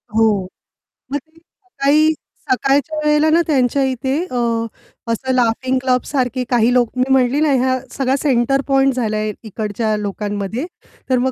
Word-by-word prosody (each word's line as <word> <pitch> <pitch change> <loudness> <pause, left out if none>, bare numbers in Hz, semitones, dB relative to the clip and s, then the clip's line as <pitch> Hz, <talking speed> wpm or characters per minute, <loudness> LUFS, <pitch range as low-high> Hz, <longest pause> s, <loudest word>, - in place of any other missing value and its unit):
हो, 215 -4 +2 0.6
मग 285 - 0
ते 320 +3 -15
सकाळी 310 -4 0 0.4
सकाळच्या 275 +4 +1
वेळेला 300 +1 +3
ना, 330 +2 +4
त्यांच्या 275 -2 +2
इथे 265 0 -1 0.2
अ, - - -4 0.8
असं 260 +3 -2
लाफिंग 255 +1 +1
क्लबसारखे 255 0 0
काही 240 -1 +3
लोक. 245 -2 +3
मी 250 - +3
म्हटलं 265 +3 +3
ना, 305 - +2
ह्या 260 0 +1
सगळा 270 -1 0
सेंटर 270 -1 +2
पॉइंट 270 -1 +3
झालाय 215 -3 -1
इकडच्या 215 0 -2
लोकांमध्ये. 205 - -3 0.4
तर 255 - +3
मग 260 +1 +1
255 Hz, 145 wpm, -18 LUFS, 230-275 Hz, 0.8 s, ना